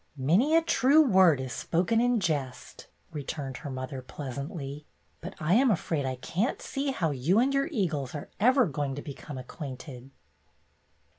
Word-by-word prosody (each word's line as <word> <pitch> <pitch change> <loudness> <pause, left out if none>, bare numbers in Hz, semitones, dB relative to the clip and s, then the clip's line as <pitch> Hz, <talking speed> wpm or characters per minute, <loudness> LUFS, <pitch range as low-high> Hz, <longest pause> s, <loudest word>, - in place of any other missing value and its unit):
"' - - -29
'''Many 195 - +3
a 330 - +3
true 305 -1 +5
word 190 - +5
is 130 -1 -4
spoken 185 +7 +1
in 245 -1 +2
jest,"" 145 -9 -3 0.2
returned 140 -3 -5
her 145 - -7
mother, 130 0 -5
pleasantly, 140 +2 -6 0.3
"but 180 +3 -7
I 160 +3 +1
am 255 +4 +5
afraid 160 -7 0
I 130 - -2
can't 180 - -2
see 275 +1 -3
how 170 - 0
you 145 +9 +1
and 260 +4 +3
your 275 +1 +1
eagles 165 - -2
are 145 - -7
ever 255 +3 +5
going 140 -4 -3
to 145 - -6
become 140 0 -8
acquainted." 130 -1 -8
155 Hz, 165 wpm, -28 LUFS, 135-225 Hz, 0.3 s, true